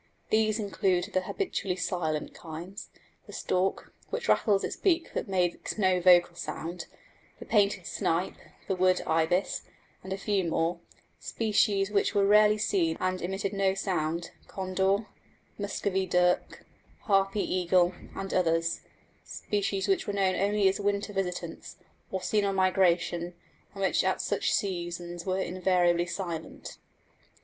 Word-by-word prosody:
These 215 0 +3
include 190 -4 0
the 185 - +2
habitually 195 - -2
silent 165 -4 -2
kinds 170 +4 -8 0.4
the - - -11
stork, 185 +1 -1 0.2
which 480 - -3
rattles 200 -3 +3
its - - -3
beak 345 -4 +1
but - - -3
makes 180 0 -1
no 185 -3 +3
vocal 175 -1 +5
sound, 170 0 -5 0.5
the - - -10
painted 200 -4 +2
snipe, 170 +3 -1 0.3
the 190 - 0
wood 185 0 +3
ibis, 165 +4 +1 0.4
and 190 - -8
a 190 - -1
few 200 -1 0
more; 165 +2 0 0.4
species 205 -2 +1
which 200 0 +1
were 200 -1 +4
rarely 210 +1 +5
seen 175 -6 +1
and 185 0 -1
emitted 190 +3 -2
no 195 -1 +1
sound 170 -3 -2 0.2
condor, 190 +2 0 0.5
Muscovy 195 -1 -1
duck, 180 0 +1 0.4
harpy 195 0 +2
eagle, 180 0 +2 0.2
and 195 0 -5
others; 165 -1 +1 0.4
species 200 -1 -2
which 195 - +1
were 205 - -1
known 195 -2 +2
only 200 +1 +2
as 190 - +1
winter 205 +1 -1
visitants, 180 -3 -4 0.4
or 190 -1 -3
seen 210 +2 +1
on 195 -1 0
migration, 175 -2 +2 0.4
and 195 - -3
which 190 - +2
at - - +1
such - - 0
seasons 175 -2 -3
were 185 0 0
invariably 180 -2 +2
silent. 170 -3 -6
190 Hz, 140 wpm, -28 LUFS, 175-200 Hz, 0.5 s, vocal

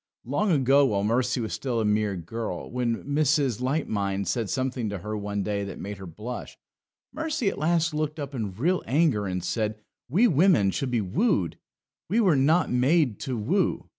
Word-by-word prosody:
Long 180 - 0
ago, 140 -1 +4
while 100 -4 0
Mercy 125 +4 +1
was 110 - -3
still 125 -4 -2
a 110 - 0
mere 105 -1 +1
girl, 90 +2 -5
when 120 -2 -1
Mrs. 140 -4 +1
Light 140 +4 0
mind 100 -2 -1
said 110 +2 -1
something 130 -4 -1
to 100 - -4
her 105 +4 -5
one 100 -1 -3
day 100 0 -2
that 100 - -6
made 100 0 -6
her 95 - -8
blush, 110 +9 -7 0.6
Mercy 310 -8 -1
at - - -6
last 165 +1 +1
looked 155 0 -2
up 140 -1 -5
in 105 -7 -4
real 175 - +1
anger 130 -6 +2
and 90 -1 -3
said, 110 +3 -2 0.3
We 200 - +4
women 160 - +4
should 135 +4 -2
be 120 -3 +1
wooed; 100 - 0 0.5
we 215 +6 +2
were 190 -9 +4
not 155 +6 +3
made 130 -1 +2
to 130 -3 -3
woo. 105 - 0
125 Hz, 190 wpm, -26 LUFS, 105-150 Hz, 0.6 s, ago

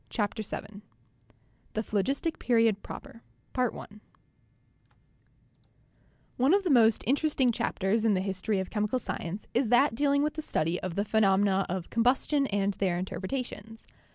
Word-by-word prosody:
CHAPTER 210 0 -2
VII 205 0 -7 0.9
THE 220 - -1
PHLOGISTIC 270 - -1
PERIOD 225 -4 +2
PROPER 265 -4 -10 0.3
One 230 -4 -3 2.5
of 400 - +1
the 355 - +1
most 225 -4 +4
interesting 270 0 +2
chapters 215 0 0
in 220 -3 +3
the 185 - 0
history 195 +2 -2
of 190 -1 -3
chemical 210 +3 0
science 195 -5 -5
is 245 -2 +1
that 245 +4 +4
dealing 280 +3 +2
with 300 - 0
the 315 - -5
study 170 - -1
of 185 -2 -4
the 200 - 0
phe 220 +1 +1
nomena 195 -1 +3
of 180 -1 -4
combustion 265 +4 +2
and 200 -2 0
their 185 -3 0
interpretations. 220 +5 -5
220 Hz, 140 wpm, -29 LUFS, 195-255 Hz, 2.5 s, most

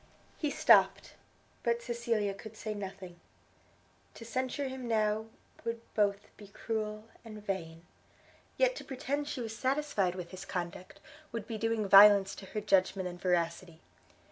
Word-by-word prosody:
He 300 - 0
stopt; 285 - +4 0.5
but 235 0 0
Cecilia 235 -4 -1
could 220 +2 -11
say 215 0 -4
nothing: 190 -3 -8 1.0
to 230 - -10
censure 260 +4 -2
him 260 -2 -6
now 220 -1 +1 0.4
would 230 0 -3
both 205 -1 0
be 205 - -12
cruel 215 +1 -4 0.2
and 215 -2 -10
vain; 170 -4 -4 0.7
yet - - +3
to - - -7
pretend 280 +2 -3
she 265 - -4
was 225 -1 -5
satisfied 255 -8 0
with 180 -2 -7
his 185 0 -8
conduct, 180 +1 -6 0.3
would 230 -3 -4
be 220 -1 -5
doing 225 -2 0
violence 200 0 +8
to 195 - -10
her 210 - -4
judgment 190 -2 +2
and 175 0 -8
veracity. 170 -1 -1
210 Hz, 145 wpm, -31 LUFS, 190-235 Hz, 1.0 s, violence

